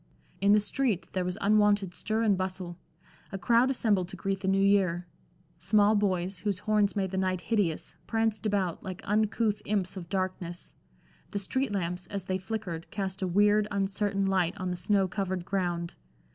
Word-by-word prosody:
In 200 +1 +4
the 210 - +6
street 210 -2 -1
there 185 - 0
was 180 +1 -3
unwonted 205 -2 +3
stir 220 +4 -1
and 210 -3 +4
bustle. 185 -2 -4 0.5
A 195 - -3
crowd 235 +7 +3
assembled 210 -8 +1
to - - -8
greet 195 -1 -2
the 190 - -4
New 195 0 +3
Year. 190 -3 +3 0.5
Small 205 +4 +4
boys, 190 -3 0
whose 205 -2 -1
horns 210 0 +1
made 190 -2 -1
the 190 - -1
night 185 -1 0
hideous, 200 -6 -1
pranced 225 -1 0
about 195 -5 0
like 185 -1 -6
uncouth 215 +1 +1
imps 200 -3 -1
of 175 -3 -7
darkness; 185 -2 -3 0.6
the - - -4
street 260 +5 -1
lamps, 180 -2 -2
as 200 -2 -5
they 185 0 -1
flickered, 185 -5 -5
cast 195 -2 -4
a 190 - 0
weird, 205 +3 +4
uncertain 195 0 0
light 190 0 +1
on 185 -2 -2
the - - -2
snow 190 +2 +2
covered 185 -1 -3
ground. 175 -3 -1
195 Hz, 175 wpm, -29 LUFS, 185-210 Hz, 0.6 s, the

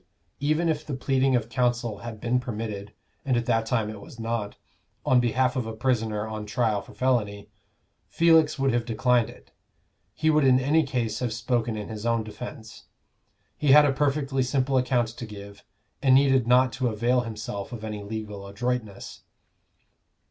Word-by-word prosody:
Even 155 +4 +1
if 155 -2 0
the 145 - -4
pleading 135 0 +1
of 115 -2 0
counsel 120 -3 -1
had 115 0 -8
been 120 +3 +1
permitted 110 -4 -5 0.3
(and 130 -3 +1
at 120 - -1
that 115 -1 +1
time 115 -3 0
it 105 -1 -7
was 115 - -13
not) 115 -2 -3 0.5
on 130 - +4
behalf 125 +1 +1
of 125 -4 -2
a 110 - -5
prisoner 110 -3 -1
on 110 -1 -6
trial 110 -2 0
for - - -15
felony, 110 -6 -1 0.6
Felix 165 -3 +4
would 135 -2 +1
have 120 -1 +1
declined 120 0 +1
it: - - -16 0.6
he 155 0 +2
would 155 -1 +3
in 130 -1 +5
any 145 +5 +3
case 120 -6 -2
have 125 -2 -2
spoken 115 -1 -1
in 105 - -5
his 110 -1 -7
own 115 -1 +1
defence. 110 +1 -9 0.7
He 145 -3 +3
had 150 0 +8
a 140 - +2
perfectly 140 -1 0
simple 130 +1 0
account 125 -2 +2
to 120 +1 -8
give, 100 -1 -11 0.4
and 130 -2 +5
needed 135 -3 +4
not 125 0 +4
to 130 -1 -1
avail 120 +3 +1
himself 105 -3 -6
of 115 -3 -7
any 105 -1 -5
legal 105 -1 -6
adroitness. 110 0 -4
120 Hz, 175 wpm, -26 LUFS, 110-130 Hz, 0.7 s, had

